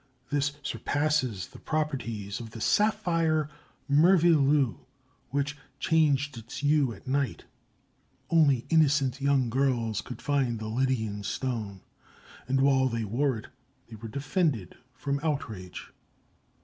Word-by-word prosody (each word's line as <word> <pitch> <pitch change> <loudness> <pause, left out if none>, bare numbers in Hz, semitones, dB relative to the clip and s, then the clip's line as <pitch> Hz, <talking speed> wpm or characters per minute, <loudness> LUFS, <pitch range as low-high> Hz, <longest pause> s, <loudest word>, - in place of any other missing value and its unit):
This 145 0 +1
surpasses 145 - -1
the - - -13
properties 125 -9 -3
of 115 -2 -7
the 115 - -9
"saphire 165 - +2 0.4
merveilleux" 150 - +4 0.5
which 140 +1 -1 0.2
changed 145 -3 +2
its 115 +4 -9
hue 145 -3 +2
at - - -11
night. 135 -2 -1 0.8
Only 145 -7 +3
innocent 145 -4 +3
young 135 -4 +2
girls 120 -5 +1
could 125 - -9
find 135 -5 0
the 110 0 -5
Lydian 110 -4 -1
stone, 105 -4 -3 0.7
and 135 +1 +2
while 135 -1 +4
they 115 -2 -2
wore 125 +5 0
it 110 - -10 0.4
they 115 - -9
were 110 +2 -8
defended 140 - -1 0.2
from 140 +3 -2
outrage. 110 - -4
135 Hz, 120 wpm, -28 LUFS, 115-150 Hz, 0.8 s, merveilleux